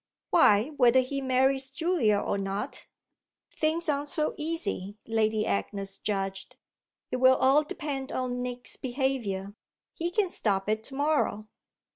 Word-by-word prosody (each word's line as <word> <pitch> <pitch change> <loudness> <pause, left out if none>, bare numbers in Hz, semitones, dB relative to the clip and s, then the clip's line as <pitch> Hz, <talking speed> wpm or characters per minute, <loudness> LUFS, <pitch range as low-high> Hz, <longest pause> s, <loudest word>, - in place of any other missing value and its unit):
"Why 210 +6 +5
whether 250 0 +6
he 275 +2 -3
marries 265 +1 +2
Julia 295 - +1
or - - -1
not." 195 +7 -4 0.7
"Things 320 +2 0
aren't 290 -1 0
so 305 0 +1
easy," 300 - -3
Lady 220 -1 +1
Agnes 195 - -3
judged. 195 -2 -3 0.6
"It - - 0
will 260 +1 +6
all 270 +4 +4
depend 290 -3 -4
on 250 -1 -2
Nick's 245 -3 -5
behaviour. 240 -7 -2 0.4
He 340 +1 -2
can 375 0 0
stop 195 -3 0
it 215 +1 0
to 270 - -7
morrow." 285 -7 0
255 Hz, 135 wpm, -28 LUFS, 210-285 Hz, 0.7 s, whether